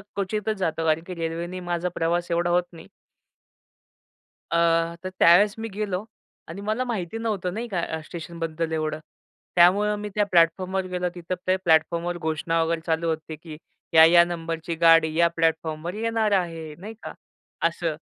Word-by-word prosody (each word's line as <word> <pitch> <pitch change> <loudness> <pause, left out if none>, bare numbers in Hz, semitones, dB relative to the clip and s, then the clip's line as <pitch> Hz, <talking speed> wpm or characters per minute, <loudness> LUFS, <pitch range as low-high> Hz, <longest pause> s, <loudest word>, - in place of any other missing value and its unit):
क्वचितच 210 +2 -2
जातो 165 -3 -1
कारण 160 +1 +1
की 180 - -5
रेल्वेने 170 +2 -4
माझा 175 0 -2
प्रवास 175 +1 -1
एवढा 170 +1 +1
होत 175 0 +3
नाही. 165 - -12 1.6
अ, 170 - +2 0.5
तर 185 - -3
त्यावेळेस 200 +5 +6
मी 225 - -4
गेलो 200 -2 -2 0.4
आणि 180 +5 -8
मला 215 +4 -1
माहिती 220 -4 -3
नव्हतं 205 -6 -2
नाही 230 +3 -4
का 190 -6 -2
अ, 160 - -3
स्टेशनबद्दल 165 -1 -5
एवढं. 155 -1 -2 0.6
त्यामुळं 200 +4 +5
मी 210 0 -5
त्या 210 -1 +2
प्लॅटफॉर्मवर 185 +3 +2
गेलो, 180 -1 -2
तिथे 175 +1 -4
ते 185 - +4
प्लॅटफॉर्मवर 170 0 +1
घोषणा 165 0 -1
वगैरे 165 0 -1
चालू 165 0 0
होते, 160 0 -4
की 155 0 -11 0.4
या, 160 0 +9
या 170 +1 +7
नंबरची 165 -1 -4
गाडी 165 -1 +5
या 170 0 +5
प्लॅटफॉर्मवर 160 +1 -1
येणार 225 -1 0
आहे, 165 -5 -1
नाही 210 +5 -8
का? - - -6 0.5
असं. 165 -2 -3
170 Hz, 160 wpm, -24 LUFS, 165-190 Hz, 1.6 s, या